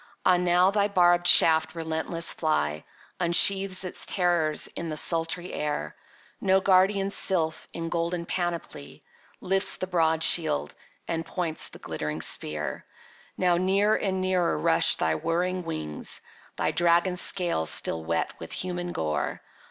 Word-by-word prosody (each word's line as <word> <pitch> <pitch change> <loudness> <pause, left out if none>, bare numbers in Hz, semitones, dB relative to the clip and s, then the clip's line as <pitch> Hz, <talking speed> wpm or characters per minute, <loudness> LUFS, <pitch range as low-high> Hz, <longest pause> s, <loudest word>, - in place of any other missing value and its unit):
—Ah 180 -1 +4
now 180 +1 +2
thy 205 0 +1
barbed 175 -3 +3
shaft, 160 -2 +5
relentless 165 +1 -2
fly, 75 - -2 0.4
Unsheaths 185 +2 +4
its 180 - -1
terrors 170 -5 +1
in 170 - -7
the 155 - -2
sultry 165 +2 +1
air! 150 -1 -4 0.5
No 190 -1 +3
guardian 195 +1 +2
sylph, 160 -6 0
in 165 0 -6
golden 170 +1 -3
panoply, 170 - -5 0.4
Lifts 190 +1 +1
the - - -4
broad 165 -3 +1
shield, 75 - +1 0.3
and 165 -1 -3
points 165 -1 -3
the - - -12
glittering 75 +1 -5
spear. 75 0 -1 0.5
Now 180 -2 +2
near 195 +4 +1
and 190 -2 -2
nearer 185 - 0
rush 75 - +3
thy 80 - -1
whirring 175 - -2
wings, 75 -1 -4 0.3
Thy - - -1
dragon 175 +1 +2
scales 175 - +2
still 80 - -1
wet 85 +1 -2
with - - -9
human 175 -1 -4
gore. 75 -1 -3
175 Hz, 135 wpm, -25 LUFS, 160-185 Hz, 0.5 s, shaft